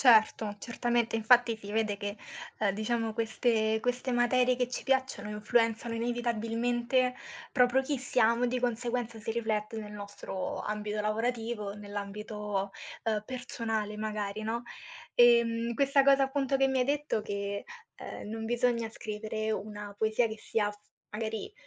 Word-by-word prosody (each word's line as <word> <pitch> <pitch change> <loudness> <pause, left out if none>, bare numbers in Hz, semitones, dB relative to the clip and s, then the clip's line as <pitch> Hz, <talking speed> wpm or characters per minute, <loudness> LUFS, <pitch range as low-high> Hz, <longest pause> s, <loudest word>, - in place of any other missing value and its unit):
Certo, 220 -3 +5
certamente. 235 -1 0
Infatti 230 +1 +5
si 205 -1 -8
vede 215 -2 +1
che, 205 +1 -4 0.4
ehm, 205 -2 +2
diciamo, 220 +2 -1
queste 220 -1 +1
queste 250 +2 -1
materie 250 +1 +4
che 250 0 0
ci 250 - -5
piacciono 260 -6 0
influenzano, 225 +2 +1
inevitabilmente, 240 +2 0 0.4
proprio 250 0 +4
chi 275 +1 -1
siamo, 245 -1 +3
di 250 +1 -1
conseguenza 240 -1 -1
si 220 +1 -3
riflette 220 -1 -1
nel 210 -1 -5
nostro 200 -2 -5
ambito 210 0 -2
lavorativo, 225 -1 -1
nell'ambito, 205 0 -4 0.3
ehm, 215 -2 0
personale, 225 -4 -3
magari, 210 -1 -3
no. 230 +2 -2 0.5
Ehm, 235 -1 +5
questa 275 +2 +4
cosa 275 0 +6
appunto 270 0 +1
che 270 0 +3
mi 265 - +1
hai 250 - +3
detto, 290 -4 0
che, 200 -1 -3 0.3
ehm, - - -7
non 225 +1 -4
bisogna 235 0 +1
scrivere 215 0 -4
una 210 -1 -4
poesia 220 +2 +2
che 220 0 -7
sia, 210 -1 0 0.4
magari, 220 - -4
225 Hz, 140 wpm, -30 LUFS, 210-245 Hz, 0.5 s, cosa